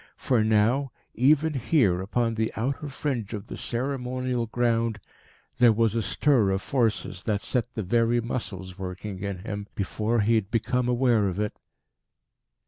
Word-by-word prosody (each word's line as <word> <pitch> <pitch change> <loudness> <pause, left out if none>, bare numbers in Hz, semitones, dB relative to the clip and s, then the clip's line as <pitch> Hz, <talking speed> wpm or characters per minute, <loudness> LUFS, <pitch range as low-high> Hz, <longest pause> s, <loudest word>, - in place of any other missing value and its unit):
For 120 -5 +2
now, 110 +5 +2 0.2
even 150 +5 +3
here, 115 - +2
upon 115 +4 0
the 110 0 -1
outer 135 +5 -2
fringe 125 -6 -3
of 100 - -7
the - - -7
ceremonial 125 -1 -2
ground, 115 -1 0 0.6
there 120 -2 +7
was 110 -1 +2
a 115 - 0
stir 120 -1 +2
of 95 0 -1
forces 115 -8 0
that 105 -2 0
set 125 -2 -1
the 110 - -2
very 115 +4 +2
muscles 95 -6 -5
working 95 +1 -6
in 100 -1 -5
him 100 -2 -4
before 110 +3 0
he 110 +3 +2
had 110 -4 +1
become 125 +2 0
aware 120 -4 +3
of 95 +1 -3
it.... 105 0 -1
115 Hz, 155 wpm, -26 LUFS, 105-125 Hz, 0.6 s, there